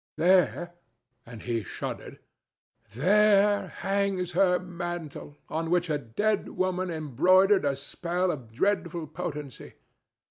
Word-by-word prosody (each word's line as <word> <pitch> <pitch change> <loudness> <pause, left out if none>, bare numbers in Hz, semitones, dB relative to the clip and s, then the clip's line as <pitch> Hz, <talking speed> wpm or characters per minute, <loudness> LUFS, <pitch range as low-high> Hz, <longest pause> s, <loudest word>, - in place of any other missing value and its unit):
There"—and 165 - -1
he 115 -2 -1
shuddered—"there 200 - -1
hangs 195 -2 -1
her 180 0 +3
mantle, 175 -5 -7
on 160 +1 -3
which 175 -1 +1
a 150 - 0
dead 200 - -1
woman 185 0 -1
embroidered 175 - +3
a 140 -1 +1
spell 175 +6 -2
of 125 -8 -8
dreadful 170 - -1
potency. 150 -4 -7
175 Hz, 100 wpm, -27 LUFS, 145-185 Hz, -, her